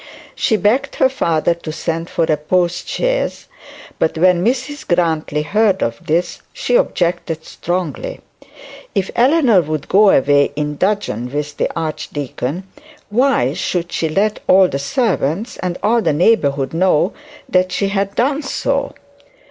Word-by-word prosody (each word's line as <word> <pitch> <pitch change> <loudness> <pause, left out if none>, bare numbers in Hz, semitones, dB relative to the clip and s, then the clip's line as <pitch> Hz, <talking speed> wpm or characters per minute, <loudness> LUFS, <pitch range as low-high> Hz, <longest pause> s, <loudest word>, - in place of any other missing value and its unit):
She 220 - +1
begged 230 +8 +1
her 265 - +3
father 170 -10 +1
to 170 -2 -7
send 165 +1 -3
for 170 - 0
a 160 -1 +2
postchaise; 180 - -1 0.5
but 160 - 0
when 180 +1 +3
Mrs 260 +5 -2
Grantly 160 -4 0
heard 200 +3 +2
of 115 0 -3
this, 170 +3 -1
she - - -1
objected 170 - 0
strongly. 185 - -4 0.8
If 190 -1 0
Eleanor 250 - +4
would 155 -2 -4
go 205 +1 +5
away 145 -2 +3
in 150 0 -3
dudgeon 160 - -1
with 150 +1 -3
the - - 0
archdeacon, 155 0 -4 0.5
why 235 - +2
should 170 +1 -2
she 160 - -1
let 200 +6 0
all 190 0 +6
the 140 - -3
servants 190 - -1
and 180 -1 -3
all 230 +3 +3
the 165 -7 +1
neighbourhood 145 - +2
know 180 +1 +2 0.3
that 185 0 +1
she 195 +2 0
had 200 0 -1
done 275 +4 +1
so? 270 - -2
175 Hz, 140 wpm, -17 LUFS, 155-215 Hz, 0.8 s, all